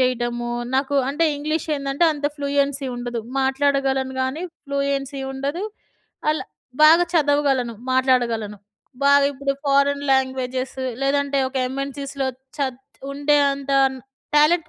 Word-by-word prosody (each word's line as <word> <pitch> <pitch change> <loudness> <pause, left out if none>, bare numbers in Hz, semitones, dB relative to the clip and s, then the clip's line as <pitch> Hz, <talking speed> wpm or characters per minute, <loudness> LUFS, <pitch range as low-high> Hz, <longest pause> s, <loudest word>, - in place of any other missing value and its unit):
చేయడము. 240 -1 0 0.2
నాకు 275 +1 +1
అంటే 310 +4 +1
ఇంగ్లీష్ 305 +2 -2
ఏందంటే 275 +4 0
అంత 290 -1 -2
ఫ్లూయెన్‌సి 280 -1 0
ఉండదు. 240 -1 -4 0.2
మాట్లాడగలను 270 -1 +1
గానీ 260 +6 -2 0.2
ఫ్లూయెన్‌సి 280 0 -2
ఉండదు. 280 +7 -3 0.7
అలా 310 - +1 0.4
బాగా 330 +3 +8
చదవగలను, 285 -6 +2 0.2
మాట్లాడగలను. 235 -5 +1 0.5
బాగా 280 0 +6
ఇప్పుడు 275 0 -1
ఫారెన్ 280 0 +2
లాంగ్వేజెస్ 260 0 -1 0.2
లేదంటే 280 0 +1
ఒక 265 - -8
ఎంఎన్‌సీస్‌లో 275 0 -4 0.3
చత్ 265 -2 -2 0.3
ఉండే 290 +1 +2 0.2
అంత 275 0 -4 0.6
టాలెంట్ 310 +3 +4
275 Hz, 110 wpm, -22 LUFS, 260-285 Hz, 0.7 s, బాగా